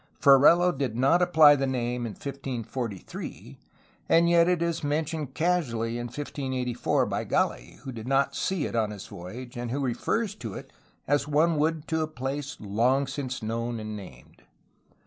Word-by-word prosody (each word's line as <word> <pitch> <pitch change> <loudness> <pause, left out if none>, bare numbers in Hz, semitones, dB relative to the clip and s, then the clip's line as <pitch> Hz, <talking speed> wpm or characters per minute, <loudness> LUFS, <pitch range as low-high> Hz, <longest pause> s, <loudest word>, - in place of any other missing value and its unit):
Ferrelo 150 +6 +6
did 130 -5 -2
not 140 +8 +4
apply 160 -4 +7
the 135 -1 -1
name 125 -2 -2
in 110 - -6
1543, 125 -6 -6 0.5
and 170 +1 +5
yet 170 0 +5
it 175 -2 +1
is 170 -2 -2
mentioned 150 -1 -2
casually 120 -10 0
in 120 - -4
1584 130 -2 -1
by - - -2
Gali, - - -1
who 135 - -7
did 115 -1 -8
not 135 +1 +2
see 185 -6 -1
it - - -4
on 110 -2 +1
his 105 -3 -8
voyage 120 +9 -9
and 120 0 -4
who 135 +4 -2
refers 165 - -1
to 115 - -7
it - - -10 0.3
as 145 +1 +1
one 155 +3 +3
would 155 +1 0
to 160 0 +1
a 155 - 0
place 140 +1 -5
long 120 +7 +1
since 135 -3 -5
known 115 +1 -2
and 110 0 -5
named. 90 -12 -12
135 Hz, 165 wpm, -27 LUFS, 120-155 Hz, 0.5 s, apply